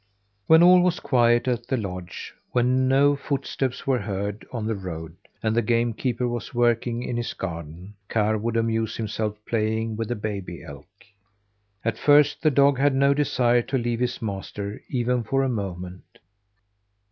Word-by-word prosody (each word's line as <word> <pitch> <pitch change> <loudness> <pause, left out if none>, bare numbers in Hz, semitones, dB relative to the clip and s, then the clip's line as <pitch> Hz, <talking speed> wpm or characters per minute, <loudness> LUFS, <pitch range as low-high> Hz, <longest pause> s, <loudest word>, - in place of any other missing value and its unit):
When 160 +1 +7
all 180 0 +7
was 180 -1 +1
quiet 120 -2 +3
at 120 -1 -1
the 130 - 0
lodge, 90 -5 -6 0.2
when 125 +1 +2
no 140 +2 +4
footsteps 135 -2 -3
were 130 -2 +2
heard 100 0 -4
on 115 -4 -4
the 110 - 0
road, 85 -5 -7 0.3
and 110 0 +1
the 120 - +3
game 115 +1 +1
keeper 125 +1 -1
was 120 0 -5
working 120 0 +1
in 120 - -3
his 120 - -3
garden, 85 +1 -7 0.2
Karr 110 -1 +1
would 115 +1 -1
amuse 115 -1 0
himself 110 -1 -3
playing 110 0 -1
with 115 0 -3
the 120 - -2
baby 100 -5 -5
elk. 70 -4 -11 1.0
At 115 -1 -1
first 145 0 +4
the 155 - +4
dog 140 -1 +4
had 140 -1 +3
no 140 +1 +4
desire 125 -4 +2
to 135 +3 -2
leave 120 -1 -1
his 125 -1 -2
master 100 0 -5
even 125 -1 0
for 135 +4 0
a 135 - 0
moment. 90 -5 -6
115 Hz, 170 wpm, -24 LUFS, 105-130 Hz, 1.0 s, When